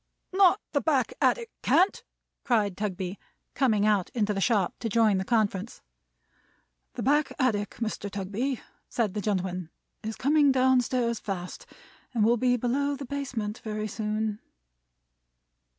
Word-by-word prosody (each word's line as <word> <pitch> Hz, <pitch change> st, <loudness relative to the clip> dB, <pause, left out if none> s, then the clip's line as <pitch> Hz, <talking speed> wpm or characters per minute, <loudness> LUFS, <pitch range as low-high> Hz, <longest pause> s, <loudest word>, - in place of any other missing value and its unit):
"Not 385 Hz, +1 st, +5 dB
the 285 Hz, -, +1 dB
back 275 Hz, -6 st, +1 dB
attic 470 Hz, -2 st, +2 dB
can't!" 375 Hz, +3 st, +3 dB, 0.4 s
cried 210 Hz, -6 st, +1 dB
Tugby, 190 Hz, -1 st, -3 dB, 0.3 s
coming 220 Hz, -7 st, +2 dB
out 205 Hz, -4 st, +2 dB
into 210 Hz, -3 st, +1 dB
the 195 Hz, -, -2 dB
shop 205 Hz, -4 st, +2 dB
to 230 Hz, -, -2 dB
join 215 Hz, -3 st, +3 dB
the -, -, -1 dB
conference. 215 Hz, -1 st, -1 dB, 1.1 s
"The -, -, -3 dB
back 295 Hz, +2 st, +2 dB
attic, 215 Hz, -6 st, 0 dB
Mr. 220 Hz, -3 st, -3 dB
Tugby," 205 Hz, +7 st, -3 dB, 0.3 s
said 220 Hz, -6 st, 0 dB
the 210 Hz, -, -2 dB
gentleman, 185 Hz, -4 st, -2 dB, 0.3 s
"is 220 Hz, 0 st, -4 dB
coming 290 Hz, +1 st, +4 dB
down 260 Hz, -1 st, +4 dB
stairs 235 Hz, -2 st, -1 dB
fast, 195 Hz, -, -6 dB, 0.5 s
and 215 Hz, -2 st, +3 dB
will 235 Hz, +2 st, +4 dB
be 245 Hz, +1 st, +2 dB
below 280 Hz, +4 st, 0 dB
the 275 Hz, 0 st, -7 dB
basement 245 Hz, -6 st, -4 dB
very 215 Hz, -1 st, -4 dB
soon." 215 Hz, 0 st, -2 dB
220 Hz, 140 wpm, -27 LUFS, 205-260 Hz, 1.1 s, Not